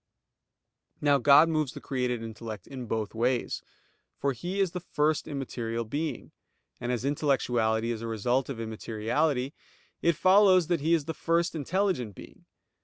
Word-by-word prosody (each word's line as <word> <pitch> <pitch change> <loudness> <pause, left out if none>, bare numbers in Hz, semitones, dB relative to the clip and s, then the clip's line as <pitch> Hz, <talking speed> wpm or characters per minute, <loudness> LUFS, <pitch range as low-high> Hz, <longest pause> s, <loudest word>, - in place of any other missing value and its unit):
Now 145 -1 +3
God 140 +5 +7
moves 155 -5 0
the - - -7
created 125 -3 -2
intellect 110 -3 -7
in 130 -3 -7
both 110 -2 -2
ways. 120 +2 0 0.6
For 140 -1 0
He 175 - -4
is 190 -3 +2
the 180 - -4
First 155 -2 0
immaterial 115 -5 -3
Being; 150 +7 -4 0.5
and 120 0 -2
as 125 +1 -2
intellectuality 120 -6 +1
is 115 -1 -4
a 115 - -4
result 120 +4 0
of 130 -5 -5
immateriality, 115 +5 -1 0.5
it 170 -1 +3
follows 185 0 +5
that 170 -4 +1
He 165 +3 +3
is 155 -4 -2
the 160 - -3
First 170 +3 0
intelligent 160 - -1
Being. - - -13
135 Hz, 155 wpm, -28 LUFS, 115-160 Hz, 0.6 s, God